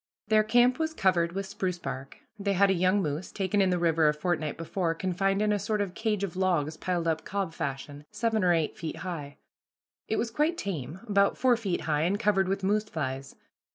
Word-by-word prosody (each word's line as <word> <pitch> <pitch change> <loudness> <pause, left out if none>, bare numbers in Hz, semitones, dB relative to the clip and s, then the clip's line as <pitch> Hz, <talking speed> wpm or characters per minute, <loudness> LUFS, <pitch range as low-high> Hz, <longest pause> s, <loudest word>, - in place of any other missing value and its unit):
Their 215 -1 +5
camp 245 +4 +4
was 320 0 -1
covered 175 - +2
with 195 +1 -3
spruce 190 -2 -3
bark. 135 -4 -6 0.2
They 200 0 0
had 195 +1 +4
a - - +4
young 185 +2 +2
moose, 150 +3 -3
taken 200 +1 0
in 190 - +3
the 180 - +2
river 165 -2 +3
a 150 - 0
fortnight 155 -2 -1
before, 165 0 -1
confined 195 +3 0
in 210 - +2
a 205 - 0
sort 215 +1 -1
of 200 -3 -2
cage 210 -2 -1
of 185 -4 -3
logs 175 -5 +1
piled 175 0 -2
up 160 -1 0
cob 195 -4 -3
fashion, 145 0 -5
seven 220 -1 0
or 180 - +4
eight 165 -3 +1
feet 160 -1 -5
high. 150 -6 -5 0.7
It 220 - 0
was 230 0 -1
quite 305 +7 +1
tame, 170 - -4
about 200 -1 +3
four 255 -1 +4
feet 205 -6 -2
high, 150 -2 0
and 185 +5 +1
covered 195 -3 +2
with 195 +1 -1
moose 210 +2 +2
flies. 135 -4 -4
185 Hz, 215 wpm, -28 LUFS, 165-205 Hz, 0.7 s, Their